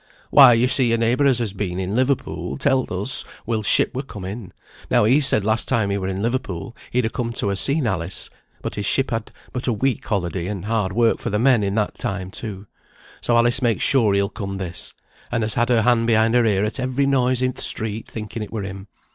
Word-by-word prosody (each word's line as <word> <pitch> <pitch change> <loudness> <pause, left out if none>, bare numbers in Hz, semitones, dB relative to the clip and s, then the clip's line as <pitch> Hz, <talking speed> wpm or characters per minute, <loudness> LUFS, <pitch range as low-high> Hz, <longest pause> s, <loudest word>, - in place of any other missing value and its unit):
"Why, 135 -4 +8
yo 115 +2 +3
see, 125 -2 +2
a - - +2
neighbour 120 +5 +2
as 130 -3 +4
has 115 -5 -2
been 95 -3 -4
in 95 +2 -3
Liverpool, 130 +2 -1
telled 135 -4 +1
us 100 +7 +2 0.2
Will's 110 -3 -2
ship - - +3
were 130 - -2
come 105 -9 -9
in. 100 0 -7 0.4
Now - - +3
he 130 +8 +4
said 110 -7 +3
last 110 +1 +2
time 110 -6 +1
he 100 - 0
were 95 - -3
in 95 +1 -3
Liverpool 115 -5 -3
he'd 125 -1 0
ha' 110 - -3
come 115 -1 -3
to 100 - -1
ha' - - 0
seen 140 +8 +1
Alice, 90 -4 -3 0.3
but - - -4
his 105 - -3
ship 135 0 +1
had 115 -1 -3 0.2
but 125 0 -4
a 120 - +2
week 130 +3 -1
holiday, 90 -3 -2
and 100 -2 -5
hard 105 -3 -1
work 115 +3 +2
for - - -3
the 105 - 0
men 120 0 +3
in 100 0 -1
that 105 -2 -1
time 95 -1 -3
too. 105 -2 -7 0.6
So 120 - +2
Alice 120 +2 +3
makes 120 -3 +1
sure 115 -7 +4
he'll 100 0 +2
come 100 -2 -6
this, 90 -4 -3 0.4
and 120 -2 0
has 110 0 +2
had 120 +1 0
her 115 -3 +3
hand 115 -1 +2
behind 110 0 +3
her 120 -1 +4
ear 100 -1 +1
at 105 - -3
every 130 +2 0
noise 130 -2 +1
in 130 0 0
th' - - -12
street, 110 0 -3
thinking 110 0 -7
it 105 - -6
were 110 -3 -4
him. 95 +1 -8
115 Hz, 240 wpm, -21 LUFS, 100-125 Hz, 0.6 s, Why